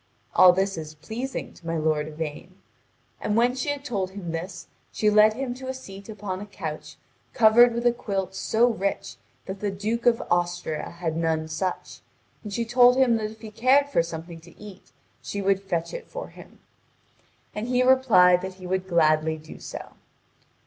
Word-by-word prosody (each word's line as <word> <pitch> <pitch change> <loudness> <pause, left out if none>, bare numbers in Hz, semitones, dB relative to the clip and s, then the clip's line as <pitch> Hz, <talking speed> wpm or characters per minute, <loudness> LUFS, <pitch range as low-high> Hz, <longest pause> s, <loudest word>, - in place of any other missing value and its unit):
All 180 - +8
this 190 -1 -1
is 155 -1 -8
pleasing 235 - -6
to 170 - -14
my 165 0 -1
lord 155 -1 0
Yvain. 155 +3 -7 0.6
And 210 - -1
when 240 +2 +3
she 260 +3 -3
had 285 -1 -3
told 195 -8 -2
him 190 -3 -7
this, 175 +2 -6 0.3
she 210 -1 +1
led 215 +1 +6
him 260 -1 -3
to 260 +1 -9
a 260 - -3
seat 200 -5 -11
upon 200 -3 -5
a 205 - -8
couch 155 -5 -7 0.4
covered 235 +2 +7
with 235 +1 -2
a 240 - +6
quilt 195 -5 -3
so 225 +4 +2
rich 200 -4 -2 0.3
that 190 +1 -6
the 205 - -1
Duke 215 +5 -2
of 230 -1 +4
Austria 175 -3 -1
had 170 -2 -4
none 160 -1 0
such, 180 +4 -4 0.4
and 210 - -7
she 230 +3 -2
told 245 +2 +5
him 250 -3 +4
that 215 -1 -3
if 220 0 -14
he 220 -2 -9
cared 265 +6 +3
for 280 - +3
something 165 0 -7
to 170 +1 -18
eat 205 -3 -13 0.3
she 200 - -5
would 195 0 +1
fetch 170 -4 -3
it - - -7
for - - -7
him; - - -15 1.0
and 210 +2 -4
he 250 0 +2
replied 210 -9 +5
that 190 0 -6
he 185 -1 -12
would 185 +1 -2
gladly 160 -2 +2
do 155 0 -12
so. - - -8
195 Hz, 190 wpm, -25 LUFS, 170-235 Hz, 1.0 s, All